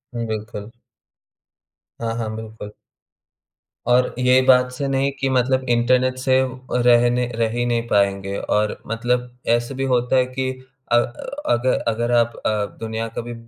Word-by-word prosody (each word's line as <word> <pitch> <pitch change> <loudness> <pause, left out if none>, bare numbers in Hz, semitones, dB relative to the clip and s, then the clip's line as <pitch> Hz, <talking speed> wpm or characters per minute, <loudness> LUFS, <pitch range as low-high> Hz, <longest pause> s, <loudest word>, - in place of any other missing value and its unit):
हुँ, 115 -1 -2
बिल्कुल। 110 -1 -5 1.3
हाँ, 115 -1 -1
हाँ, 110 -2 -3
बिल्कुल। 110 -1 -8 1.2
और 125 +1 +3
ये 125 +1 +5
बात 125 -1 +5
से 140 +2 -3
नहीं 135 +1 +1
कि 135 - 0
मतलब 130 +1 +1
इंटरनेट 125 +2 +2
से 130 0 +2
अ, 130 0 -5
रहने 120 0 +3
रहे 115 -1 +1
ही 120 - +1
नहीं 120 -1 -1
पाएँगे। 100 -1 +1
और 105 0 0
मतलब 125 +2 -1 0.3
ऐसे 120 +3 -5
भी 135 - -2
होता 125 +1 +1
है 130 -1 +4
कि 130 +1 -3 0.4
अ, - - +5
अगर 125 - -1
अगर 120 +1 0
आप 115 0 +1
अ, 105 -1 +1
दुनिया 115 0 -3
कभी 120 0 -4
120 Hz, 150 wpm, -21 LUFS, 115-130 Hz, 1.3 s, ये